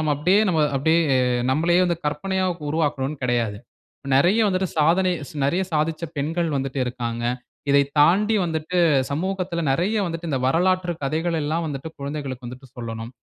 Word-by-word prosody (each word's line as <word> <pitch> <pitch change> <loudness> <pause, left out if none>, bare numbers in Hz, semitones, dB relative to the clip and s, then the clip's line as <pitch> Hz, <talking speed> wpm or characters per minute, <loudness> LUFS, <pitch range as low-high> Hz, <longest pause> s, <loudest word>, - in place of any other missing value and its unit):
நம்ம 155 -1 +1
அப்படியே 180 +8 +3 0.4
அப்படியே 160 +5 +3 0.5
நம்பளையே 170 +6 +3
வந்து, 170 -2 0
கற்பனையா 190 +6 -1 0.3
உருவாக்கணும்ன்னு 145 -3 -1
கிடையாது. 115 -4 0 0.6
நெறைய 180 +11 +4
வந்துட்டு, 185 -1 0
சாதனை 180 +4 +3 0.3
நெறைய 175 +7 +1
சாதிச்ச 155 +2 0
பெண்கள் 165 +3 -1
வந்துட்டு 135 0 -3
இருக்காங்க. 120 -1 -4 0.5
இதை 140 0 +5 0.2
தாண்டி 200 +9 +4
வந்துட்டு 165 +2 -2 0.3
சமூகத்தில, 180 +2 -2
நெறைய 185 +10 0
வந்துட்டு, 165 0 -5
இந்த 135 -2 -1
வரலாற்று 180 +3 +1
கதைகள் 165 +4 -1
எல்லாம் 160 +3 -1
வந்துட்டு 145 0 -5
குழந்தைகளுக்கு 140 -3 -5
வந்துட்டு 125 +2 -10
சொல்லணும். 115 -1 -6
155 Hz, 135 wpm, -23 LUFS, 135-175 Hz, 0.6 s, இதை